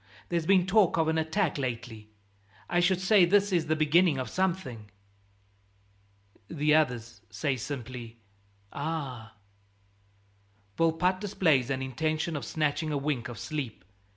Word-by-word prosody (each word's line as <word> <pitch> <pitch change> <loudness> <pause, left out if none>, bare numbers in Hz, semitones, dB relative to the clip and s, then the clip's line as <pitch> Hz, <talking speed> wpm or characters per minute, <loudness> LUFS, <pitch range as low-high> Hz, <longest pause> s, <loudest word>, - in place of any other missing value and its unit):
"There's 170 -2 -1
been 190 -2 +4
talk 195 -2 +3
of 160 -1 +2
an 160 0 +1
attack 160 0 0
lately; 115 -4 -5 0.6
I 175 - +1
should 175 +1 +2
say 190 +1 +5
this 200 +3 +3
is 170 -3 +1
the 155 - +2
beginning 155 +1 +3
of 130 -3 -4
something." 170 - -2 1.6
The 150 -1 +1
others 120 -8 0
say 140 -3 -1
simply, 120 -2 -7 0.6
"Ah!" 140 -7 -4 1.4
Volpatte 165 +3 +1
displays 160 - +2
an 135 -1 -1
intention 155 +5 -2
of 145 - -4
snatching 155 0 -1
a 145 - 0
wink 135 -4 -2
of 120 - -8
sleep. 130 - -5
155 Hz, 130 wpm, -28 LUFS, 130-175 Hz, 1.6 s, say